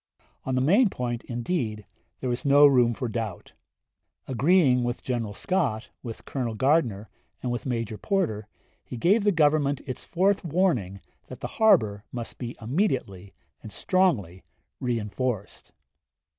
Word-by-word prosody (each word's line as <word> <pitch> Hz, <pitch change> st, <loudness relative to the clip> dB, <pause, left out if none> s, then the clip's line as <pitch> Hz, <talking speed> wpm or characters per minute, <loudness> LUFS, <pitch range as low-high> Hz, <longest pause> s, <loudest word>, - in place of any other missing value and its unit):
On 130 Hz, -, -1 dB
the 130 Hz, -, +2 dB
main 200 Hz, -, +4 dB
point, 120 Hz, -6 st, -4 dB
indeed, 120 Hz, -, -3 dB, 0.4 s
there 130 Hz, -, -2 dB
was 120 Hz, -, -3 dB
no 145 Hz, 0 st, +6 dB
room 125 Hz, -4 st, +4 dB
for 125 Hz, -, -3 dB
doubt. 110 Hz, -5 st, -5 dB, 0.7 s
Agreeing 135 Hz, -1 st, +3 dB
with 120 Hz, 0 st, -3 dB
General 115 Hz, -5 st, -3 dB
Scott, 135 Hz, -, -1 dB
with 115 Hz, -3 st, -8 dB
Colonel 120 Hz, -5 st, -3 dB
Gardner, 120 Hz, -5 st, +1 dB, 0.4 s
and 125 Hz, -, -1 dB
with 120 Hz, +2 st, -4 dB
Major 115 Hz, -4 st, -3 dB
Porter, 110 Hz, -, -1 dB, 0.4 s
he 125 Hz, -, -8 dB
gave 200 Hz, -, +3 dB
the 205 Hz, -, +4 dB
Government 150 Hz, -4 st, +2 dB
its 130 Hz, -, -6 dB
fourth 190 Hz, +3 st, +1 dB
warning 140 Hz, -, 0 dB, 0.3 s
that -, -, -10 dB
the -, -, -3 dB
harbor 110 Hz, -, +4 dB
must 120 Hz, -2 st, -7 dB
be 120 Hz, -1 st, -6 dB
immediately 115 Hz, -, -2 dB, 0.3 s
and 110 Hz, -, -10 dB
strongly 110 Hz, -, 0 dB, 0.4 s
reenforced. 115 Hz, -2 st, -3 dB
125 Hz, 140 wpm, -26 LUFS, 110-155 Hz, 0.7 s, no